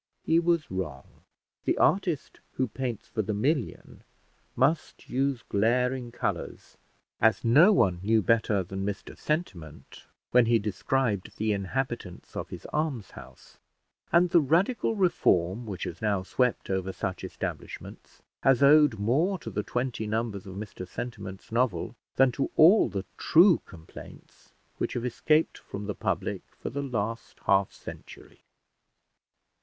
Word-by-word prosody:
He 165 +1 +3
was 170 -2 0
wrong. 75 -8 -4 0.6
The - - +1
artist 175 -7 +1
who 130 - 0
paints 120 -3 -4
for 110 - -2
the 105 0 -3
million 125 - -2 0.5
must 140 +6 0
use 135 -1 -1
glaring 125 +4 +1
colours, - - -4 0.4
as 110 0 +3
no 150 - +7
one 95 - +3
knew 110 +2 +2
better 110 -1 +2
than 95 +2 -5
Mr 100 0 -5
Sentiment 90 - -5 0.2
when 125 -2 +5
he 115 0 +5
described 110 0 -1
the 110 0 +1
inhabitants 105 -1 -4
of - - -4
his - - -9
almshouse; 150 - -5 0.5
and 175 +1 +4
the 170 - +6
radical 185 - +1
reform 115 - +2
which 95 -4 -5
has - - -6
now 100 -3 0
swept 125 +2 0
over 95 0 -1
such 95 0 -4
establishments - - -7 0.2
has 135 0 +4
owed 145 -4 +6
more 145 - +1
to - - -8
the 105 - -1
twenty 120 -1 -3
numbers 110 -3 -2
of 95 - -8
Mr 100 -3 -7
Sentiment's 105 -3 -7
novel, 115 -7 0 0.2
than 135 -1 +5
to 135 - -2
all 180 +8 +6
the 100 -1 -4
true 175 +1 +5
complaints 80 -4 -14 0.3
which - - -1
have 120 0 -3
escaped 150 +6 +1
from 100 +1 -7
the 105 - -3
public - - -2 0.2
for - - -5
the 140 +3 -3
last 115 -4 -4
half 95 0 +3
century. - - -12
115 Hz, 140 wpm, -28 LUFS, 100-140 Hz, 0.6 s, no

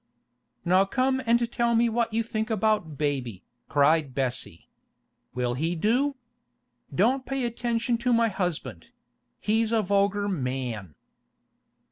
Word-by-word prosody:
'Now 185 +3 +4
come 260 +5 0
and 235 0 +2
tell 235 -1 +1
me 235 +1 +4
what 230 0 0
you 225 +1 0
think 220 0 -3
about 215 -8 0
baby,' 130 -9 -2 0.3
cried 145 -1 +3
Bessie. 125 -10 -3 0.7
'Will 125 -1 0
he 160 +7 -1
do? 250 - +1 0.8
Don't 260 +1 +2
pay 270 - -4
any - - 0
attention 235 0 -1
to 245 +1 0
my 230 -1 +4
husband; 165 - -3 0.5
he's 220 +1 +1
a 225 -2 +2
vulgar 200 +1 +1
man! 125 - -3
205 Hz, 130 wpm, -26 LUFS, 145-235 Hz, 0.8 s, Now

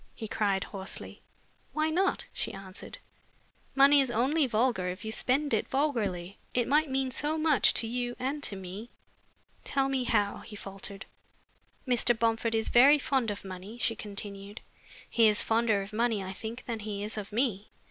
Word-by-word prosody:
he 220 - -6
cried, 200 -2 0
hoarsely. 195 -2 -6 0.5
"Why 310 +1 +1
not?" 375 +4 +1
she - - -3
answered. 190 -1 -8 0.8
"Money 280 +1 +7
is 265 - 0
only 265 +6 +2
vulgar 225 -5 +1
if 185 +3 -5
you 220 - -3
spend 275 +6 +1
it - - +1
vulgarly. 205 - -1 0.2
It 245 -1 +2
might 300 +2 +3
mean 265 -1 0
so 295 +5 0
much 310 -3 +4
to - - +1
you 245 +1 -2
and 275 +4 -2
to 205 - -1
me." 190 +5 -8 0.7
"Tell 270 -1 0
me 265 -2 0
how?" 205 -3 +1
he 210 - -10
faltered. 195 0 -6 0.8
"Mr. 240 -1 +3
Bomford 225 0 +1
is 220 - +1
very 275 +5 +7
fond 265 -4 0
of 205 -1 -5
money," 190 +4 -8
she 230 -1 0
continued. 200 0 -6 0.5
"He 230 -2 +4
is 210 -1 +3
fonder 225 -3 +2
of 200 +2 -11
money, 225 -2 +1
I 190 0 -5
think, 230 +5 -7
than 230 -2 -3
he 205 -1 -4
is 210 - -4
of 210 -2 -6
me. 215 -3 0
225 Hz, 175 wpm, -29 LUFS, 200-265 Hz, 0.8 s, Money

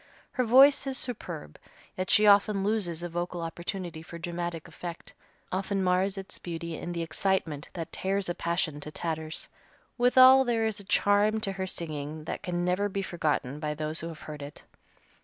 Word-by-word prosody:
Her 255 - 0
voice 270 +4 +6
is 265 -1 -1
superb, 170 - -5 0.4
yet 185 0 -3
she 210 - +5
often 200 -1 +5
loses 190 -6 0
a 175 - -3
vocal 175 +1 -3
opportunity 170 0 -4
for 170 +1 -9
dramatic 170 -1 -4
effect, 170 -1 -8 0.4
often 195 +1 -1
mars 185 +2 +2
its 195 0 -5
beauty 170 -1 -5
in 175 - -5
the 170 -1 -2
excitement 165 -3 -1
that 165 -3 -5
tears 195 0 -1
a 175 - 0
passion 170 -3 -1
to 150 - -6
tatters. 160 0 -3 0.5
Withal 255 +2 +8
there 235 -3 +1
is 220 -1 -1
a - - -9
charm 205 +3 +3
to 195 - +1
her 190 -1 -3
singing 155 -3 -4
that - - -5
can 175 -3 -2
never 185 +3 +1
be 195 0 -2
forgotten 150 -6 -1
by 150 -1 -2
those 155 +1 -2
who 165 - -4
have 160 -2 -9
heard 150 -1 -8
it. 145 +1 -9
175 Hz, 180 wpm, -28 LUFS, 165-200 Hz, 0.5 s, Withal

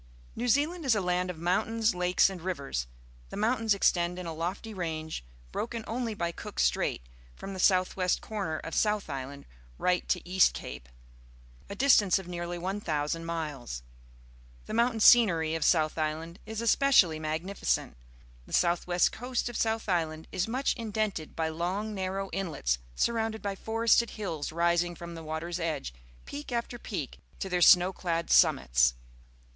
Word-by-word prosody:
— - - -25
New 240 +2 -2
Zealand 305 +8 +1
is 260 -5 +3
a - - +2
land 180 -1 0
of 180 - -5
mountains, 220 +7 +1
lakes, 180 0 +3
and 190 -3 -6
rivers. 140 - -3 0.4
The - - -7
mountains 220 0 +2
extend 175 -2 +2
in 180 - -6
a 165 - -4
lofty 180 +7 -4
range, 160 - -4 0.3
broken 230 0 -3
only 230 -1 -3
by 170 -3 -1
Cook 210 +4 -9
Slmil, - - +1 0.3
from 195 - -7
the 190 - -7
south 185 -1 +3
west 185 -1 +1
corner 195 -8 -3
of 165 - -7
South 210 -6 +1
Island 140 +1 -6 0.3
right 180 -1 0
to 180 -1 0
East 185 0 +4
Cape - - -8 0.4
— - - -25
a - - -5
distance 210 -7 +5
of 190 -2 -7
nearly 175 0 -4
1 190 +4 -3
,000 155 -1 -2
miles. 150 - -4 0.8
The - - -6
moun 235 +2 +3
tain 225 - -4
scenery 170 -10 +6
of 165 - -1
South 155 -3 +3
Island 160 +4 -3
is 220 0 -4
especially 230 - +4
magnificent. 160 +6 -2 0.5
The - - -11
south 175 0 +2
west 175 0 +3
coast 245 +1 -3
of 240 - -8
South 225 0 0
Island 160 -4 -1
is 185 - -1
much 255 +4 0
indented 215 -8 -3
by 160 -1 -1
long, 185 +7 -2
narrow 195 0 -3
inlets, 160 - -1 0.2
surrounded 225 - 0
by 200 -1 -1
forested 225 +3 +2
hills 165 -10 -4
rising 170 +1 +1
from 170 0 -8
the 165 - -8
water's 160 +3 -4
edge, 155 - -3 0.3
peak 145 - -7
after 240 0 -3
peak, 160 - -5 0.2
to - - -4
their 180 -1 0
snow 180 +2 +7
clad 170 -2 -2
summits. - - +4
180 Hz, 170 wpm, -29 LUFS, 160-215 Hz, 0.8 s, snow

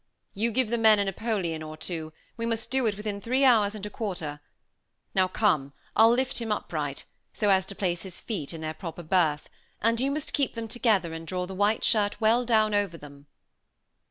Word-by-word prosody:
"You 220 +4 0
give 235 0 0
the 235 - +1
men 220 -1 +6
a 200 - +1
Napoleon 195 -5 -2
or 155 0 -7
two; 160 -1 -4 0.2
we 230 - -5
must 230 0 -2
do 260 -3 +2
it 205 -2 -1
within 210 -1 -4
three 255 +5 +1
hours 215 -5 +4
and 210 -1 -6
a - - -4
quarter. 170 -9 -4 0.7
Now, 190 -1 +3
come; 170 -9 +1 0.2
I'll 225 +1 +7
lift 255 +3 +1
him 230 -2 -3
upright, 150 -8 -3 0.3
so 210 -2 +2
as 190 -1 +3
to 200 - -6
place 175 -3 -1
his 185 -3 -6
feet 180 -11 -4
in 165 -2 -7
their 155 0 -3
proper 165 +1 -7
berth, 155 -3 +1 0.3
and 230 +1 +2
you 270 - +2
must 295 +1 -3
keep 280 -4 0
them 230 -1 -4
together 210 -7 +1
and 165 0 -7
draw 180 +2 -2
the 190 - -8
white 205 +3 +1
shirt 205 -2 +2
well 230 +2 +3
down 215 -2 +3
over 200 -5 0
them." 145 -1 -13
205 Hz, 210 wpm, -27 LUFS, 170-225 Hz, 0.7 s, I'll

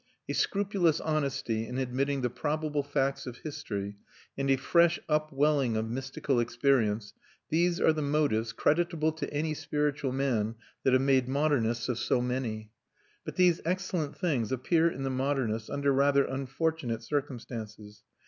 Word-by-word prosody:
A - - -2
scrupulous 195 -5 +1
honesty 140 -7 -1
in 125 - -5
admitting 135 +2 0
the 125 - 0
probable 150 +3 -1
facts 140 -1 -1
of 125 -1 -6
history, 100 -9 -5 0.4
and 135 0 -1
a 135 - +6
fresh 170 +5 +3
upwelling 150 -5 +2
of 110 +1 -2
mystical 130 0 -1
experience, 115 -3 +1 0.4
these 170 +2 +2
are 160 - +4
the 155 - -2
motives, 140 -7 +1
creditable 160 -1 +1
to 155 - -5
any 155 +2 -1
spiritual 150 -2 -1
man, 120 -5 0 0.3
that 130 - +3
have 130 +1 +4
made 135 -2 +3
modernists 130 -5 +1
of 120 -2 -1
so - - +1
many. 120 -4 -3 0.5
But - - -6
these 180 -2 +4
excellent 175 -3 -2
things 140 - 0
appear 160 +6 +2
in 135 -4 -6
the 135 - -1
modernists 130 -5 -1
under 140 -1 +1
rather 140 +1 +4
unfortunate 135 -2 -2
circumstances. 115 -6 -5
135 Hz, 150 wpm, -29 LUFS, 120-155 Hz, 0.5 s, a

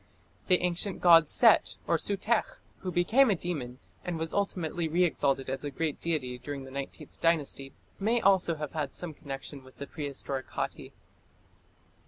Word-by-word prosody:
The 180 -2 +4
ancient 180 +2 -1
god 165 -3 +7
Set - - +5
(Sutekh), 205 +3 0 0.2
who 185 - -4
became 225 +10 +4
a 200 - +3
demon, 145 -9 -4 0.3
and 175 -2 -3
was 160 0 -3
ultimately 175 -4 -1
re 170 +3 +2
exalted 135 -5 +1
as 135 +1 -3
a 145 - -2
great 150 +1 -2
deity 130 -7 -2
during 140 +1 -6
the 130 - -11
Nineteenth 140 0 -7
Dynasty, 150 -4 +1 0.3
may 225 +4 +2
also 190 -5 +3
have 150 -2 -5
had 150 -4 -3
some 175 -3 -4
connection 135 -1 -8
with 130 0 -17
the 140 - -5
prehistoric 140 -3 -5
Hatti. - - -4
160 Hz, 160 wpm, -29 LUFS, 140-180 Hz, 0.3 s, god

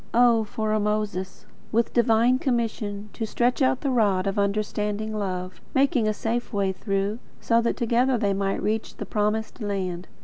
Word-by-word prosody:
O 235 -2 +5
for 215 +1 -2
a 215 - +2
Moses, 205 -3 -2 0.3
with 230 +1 +1
divine 240 +1 +4
commission, 220 -5 -2
to 225 - -3
stretch 245 +5 +1
out 260 -1 +2
the 275 - 0
rod 205 -6 +2
of 200 +1 -1
understanding 210 +1 -1
love, 185 -3 -4
making 265 -4 +3
a - - +3
safe 235 +3 -2
way 200 -3 +1
through; 195 +2 -2 0.2
so 230 0 +2
that 235 - 0
together 245 +2 +2
they 205 -3 +1
might 195 0 -1
reach 220 +1 -1
the - - -5
Promised 215 +3 -1
Land! 185 -4 -3
215 Hz, 170 wpm, -25 LUFS, 200-235 Hz, 0.3 s, O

